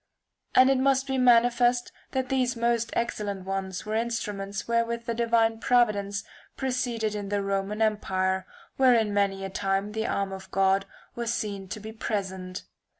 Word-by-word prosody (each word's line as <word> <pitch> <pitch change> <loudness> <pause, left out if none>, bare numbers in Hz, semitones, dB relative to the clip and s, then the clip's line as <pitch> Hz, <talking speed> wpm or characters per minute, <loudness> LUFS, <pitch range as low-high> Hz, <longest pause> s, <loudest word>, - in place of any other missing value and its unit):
And 260 +1 +7
it 265 - +2
must 270 0 +3
be 265 -1 -1
manifest 245 0 +4 0.2
that 260 -1 -1
these 255 -2 +1
most 235 0 +1
excellent 205 -5 -2
ones 190 0 -3
were 215 - -3
instruments 210 -3 -2
wherewith 235 0 0
the 235 - -1
divine 230 -1 +2
providence 205 -5 +2 0.3
proceeded 245 -4 -1
in 205 -1 -4
the 205 -1 0
Roman 195 +2 -1
empire, 190 -3 0 0.3
wherein 235 -5 +4
many 195 -1 +1
a 195 - -6
time 195 +2 -1
the 220 +1 -2
arm 195 -1 -1
of 190 0 -9
God 195 0 +2 0.3
was 235 -1 -2
seen 200 -4 -3
to 200 - -6
be 215 +1 -8
present. 190 -4 -4
215 Hz, 155 wpm, -27 LUFS, 195-235 Hz, 0.3 s, And